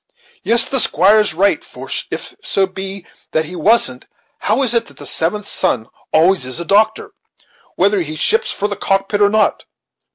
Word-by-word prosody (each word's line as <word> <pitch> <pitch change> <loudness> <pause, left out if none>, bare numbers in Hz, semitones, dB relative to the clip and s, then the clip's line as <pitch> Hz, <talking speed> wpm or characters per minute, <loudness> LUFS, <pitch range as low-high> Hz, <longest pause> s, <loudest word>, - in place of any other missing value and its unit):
Yes, 230 0 +4
the 265 - 0
squire 200 +2 +4
is 205 -6 0
right; 200 +3 +1
for - - -11 0.2
if - - -6
so 195 - +1
be 190 0 -7 0.3
that 160 0 +1
he 180 +4 -8
wasn't, 230 +5 +2 0.3
how 275 - 0
is 245 - +2
it 230 -1 0
that - - -16
the - - -9
seventh 200 +6 -1
son 115 -1 0 0.2
always 175 +1 +3
is 130 +5 -3
a 170 - -4
doctor, 220 - +1 0.6
whether 200 +1 +2
he 155 -2 -5
ships 450 - 0
for 205 - -2
the 205 - -4
cockpit 195 +2 -1
or 205 - +5
not? 215 +1 +1
200 Hz, 185 wpm, -17 LUFS, 180-220 Hz, 0.6 s, or